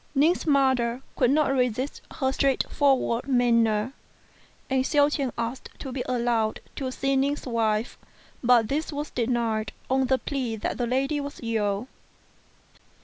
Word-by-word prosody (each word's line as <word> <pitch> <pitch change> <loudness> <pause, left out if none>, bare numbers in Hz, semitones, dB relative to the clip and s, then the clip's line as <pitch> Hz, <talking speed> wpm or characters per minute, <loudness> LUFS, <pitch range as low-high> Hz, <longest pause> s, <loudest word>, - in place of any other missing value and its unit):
Ning's 315 +5 +3
mother 260 -3 +2
could 250 - +3
not 290 0 +3
resist 250 +1 -1
her 265 -1 0
straightforward 270 -2 +1
manner, 235 -2 +2 0.7
and 265 -1 +1
Hsiao 290 +1 +3
ch'ien 275 -4 -1
asked 235 +2 -4
to 265 - -6
be 255 0 -3
allowed 235 -3 0 0.2
to 260 -2 -2
see 275 +1 0
Ning's 280 +2 0
wife, 225 -2 0 0.4
but 235 -2 +5
this 305 +6 -2
was 295 0 -4
denied 230 -3 -1 0.2
on 265 0 +2
the 265 +1 +3
plea 255 -5 -3
that 220 - -3
the 240 - 0
lady 270 +4 0
was 285 0 -6
ill. 215 -1 -1
255 Hz, 145 wpm, -26 LUFS, 235-275 Hz, 0.7 s, but